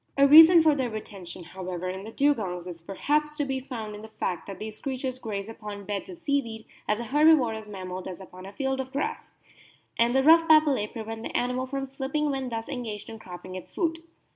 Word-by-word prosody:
A 280 0 +6
reason 325 +3 +10
for 310 -1 +5
their 260 -4 -1
re 215 -1 -4
tention, 185 -3 -10
however, 185 0 -5
in 190 +1 -4
the 220 - -8
Dugongs 215 -11 0
is 175 -2 -8
perhaps 300 - -1
to 290 - 0
be 270 -1 -2
found 230 -5 -6
in 210 - -8
the 220 - -9
fact 185 -5 -4
that 195 - -7
these 215 0 -7
creatures 260 -2 -4
graze 205 -4 -4
upon 210 -2 -8
beds 205 - -4
of 360 - -8
seaweed 280 -9 -2 0.2
as 210 +1 +1
a - - -3
Herbivorous 250 -5 +3
mammal 185 -2 -6
does 185 -1 -7
upon 185 0 -11
a - - -9
field 265 +3 -2
of 265 0 -4
grass; 440 +12 -3 0.7
and 235 +2 +3
the 265 - +4
rough 330 +2 +7
papillae 300 -9 +5
prevent 225 -1 -7
the - - -3
animal 250 +1 -1
from 275 +1 -3
slipping 270 +2 -2
when 265 -2 -3
thus 225 -1 -4
engaged 220 -5 -5
in 225 - -9
cropping 185 -1 -9
its 185 -1 -8
food. 330 -2 -1
235 Hz, 215 wpm, -27 LUFS, 200-280 Hz, 0.7 s, reason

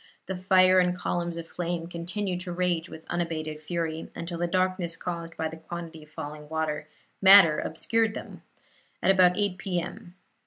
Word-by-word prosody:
The 190 - -4
fire 185 0 +5
and 180 0 +2
columns 175 -1 -2
of 165 -1 -6
flame 175 -1 -3
continued 180 +2 -3
to 180 -1 -5
rage 175 -1 0
with 160 - -11
unabated 155 -3 -3
fury, 160 0 -3
until 170 0 -5
the 175 - +1
darkness 185 -1 0
caused 170 -1 -5
by 160 - -1
the 160 - -8
quantity 165 0 -8
of 150 - -16
falling 150 -1 -7 0.7
matter 190 -5 +8
obscured 220 +7 0
them, - - -8 0.6
at - - +6
about 180 -2 +5
8 200 -3 0
P. 180 -1 -1
M. 180 +1 -8
175 Hz, 165 wpm, -27 LUFS, 165-185 Hz, 0.7 s, matter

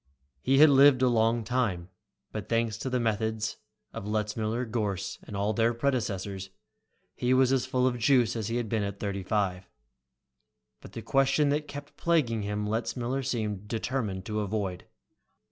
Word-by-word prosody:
He 135 +1 +3
had 150 +1 +8
lived 135 -1 +6
a - - +5
long 115 -1 +2
time, 110 -7 -1 0.4
but - - -6
thanks 115 -1 +1
to 130 - -3
the 125 0 0
methods 110 -1 -1 0.4
of 100 - -6
Letzmiller, 110 +3 -1
Gorss, 105 -5 -3
and 100 - -7
all 100 +2 0
their 115 +2 +2
predecessors, 100 -7 -2 0.6
he 125 +1 +1
was 130 0 +4
as 130 -1 +1
full 130 0 +1
of 125 -1 0
juice 120 -1 +3
as 110 -3 -2
he 115 - -2
had 120 -2 -1
been 110 0 0
at 100 -1 -4
thirty 100 -1 -3
five. 95 -2 -1 1.1
But - - -13
the - - -6
question 135 +2 +2
that 150 +1 0
kept 145 0 -9
plaguing 140 -10 +1
him 105 +1 -2
Letzmiller 120 +4 -2
seemed 105 -6 -3
determined 110 -4 -2
to 110 -1 -2
avoid. 100 -3 -3
115 Hz, 165 wpm, -28 LUFS, 105-130 Hz, 1.1 s, had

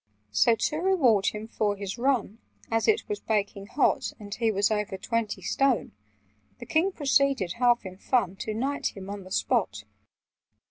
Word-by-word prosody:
"So, 105 - +4
to 300 - -1
reward 300 - +3
him 215 +1 -2
for 210 -2 -1
his 200 +2 -6
run 240 -4 0 0.3
(As 225 0 +1
it 435 0 +2
was 420 -1 -3
baking 200 -2 -2
hot, 275 +7 +1
And 205 -1 -8
he 230 0 +1
was 205 0 +1
over 210 -2 -1
twenty 225 +1 -2
stone), 270 -3 +1 0.7
The 240 - -9
King 330 +8 +2
proceeded, 275 - +1
half 240 -3 +3
in 185 0 -8
fun, 200 -8 +1
To 215 +2 -4
knight 270 0 -2
him 195 0 -7
on 200 -2 -7
the - - -11
spot." 190 - 0
225 Hz, 170 wpm, -27 LUFS, 200-265 Hz, 0.7 s, So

